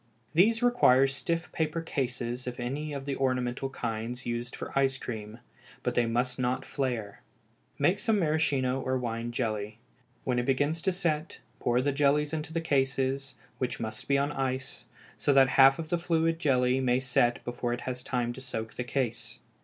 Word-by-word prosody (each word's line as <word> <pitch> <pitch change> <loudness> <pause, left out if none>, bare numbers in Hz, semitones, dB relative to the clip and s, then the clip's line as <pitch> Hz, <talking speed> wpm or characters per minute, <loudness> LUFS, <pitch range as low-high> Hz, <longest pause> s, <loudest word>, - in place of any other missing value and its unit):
_ - - -39 0.3
These 225 +8 +4
require 230 - +5
stiff 165 +5 -2
paper 160 0 -1
cases 125 -5 -3
of 125 0 -5
any 140 +5 -3
of 140 -1 -5
the 140 -1 -2
ornamental 130 0 0
kinds 120 0 -4
used 120 +1 -3
for - - -7
ice 135 -1 +2
cream, 110 -1 -6 0.5
but - - 0
they 120 -1 +2
must 125 +2 0
not 125 +1 0
flare. 120 -7 -3 0.6
Make 175 +8 +2
some 225 -2 +2
maraschino 145 -6 +1
or 130 0 0
wine 120 -1 -3
jelly. 110 -3 -2 0.5
When 125 -1 +1
it 120 - -2
begins 145 +5 +1
to 190 - +2
set, 165 -4 -1 0.2
pour 120 +1 +2
the 145 - +2
jelly 145 +1 +3
into 155 0 -3
the 165 0 -1
cases, 135 -2 0 0.2
which 125 -1 -2
must 110 -1 -5
be 140 - +3
on 140 +1 +1
ice, 130 -1 -3 0.3
so 145 - +3
that 135 -1 +6
half 135 0 +7
the 165 +1 -2
fluid 165 -1 +1
jelly 130 -4 +3
may 125 -1 +2
set 125 -2 +1
before 120 0 -2
it 120 0 -2
has 125 -1 -4
time 120 -1 -1
to 130 - -9
soak 115 -4 -5
the 125 - -3
case. 120 -2 -2
130 Hz, 180 wpm, -29 LUFS, 120-150 Hz, 0.6 s, half